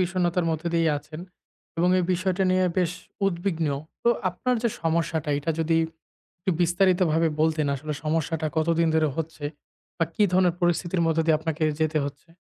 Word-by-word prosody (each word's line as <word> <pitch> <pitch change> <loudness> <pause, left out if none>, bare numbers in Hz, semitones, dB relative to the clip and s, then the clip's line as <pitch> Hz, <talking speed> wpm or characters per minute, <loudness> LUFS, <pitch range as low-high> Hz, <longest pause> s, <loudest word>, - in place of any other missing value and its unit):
বিষণ্ণতার 180 -1 +1
মধ্য 160 -1 -2
দিয়ে 165 -1 +3
আছেন। 155 +2 -10 0.6
এবং 175 - +3
এই 180 - +1
বিষয়টা 185 +1 0
নিয়ে 185 0 +3
বেশ 175 -1 +1 0.3
উদ্বিগ্ন। 170 -3 -1 0.4
তো - - +3 0.2
আপনার 250 +8 -1
যে 235 - +3
সমস্যাটা 165 -2 0
এটা 150 +3 -2
যদি 165 0 +2 0.6
একটু 185 +2 -1
বিস্তারিতভাবে 175 -2 +3
বলতেন 155 -1 +2
আসলে 150 +3 -4
সমস্যাটা 160 0 0
কতদিন 165 +1 +2
ধরে 160 -1 +3
হচ্ছে 160 -2 -5 0.5
বা 165 - +3
কি - - +2
ধরনের 180 -2 +3
পরিস্থিতির 175 0 +1
মধ্যে 165 0 +2
দিয়ে 160 -2 +5
আপনাকে 160 0 -3 0.2
যেতে 155 0 +1
হচ্ছে। 145 +3 -8
165 Hz, 160 wpm, -25 LUFS, 160-180 Hz, 0.6 s, দিয়ে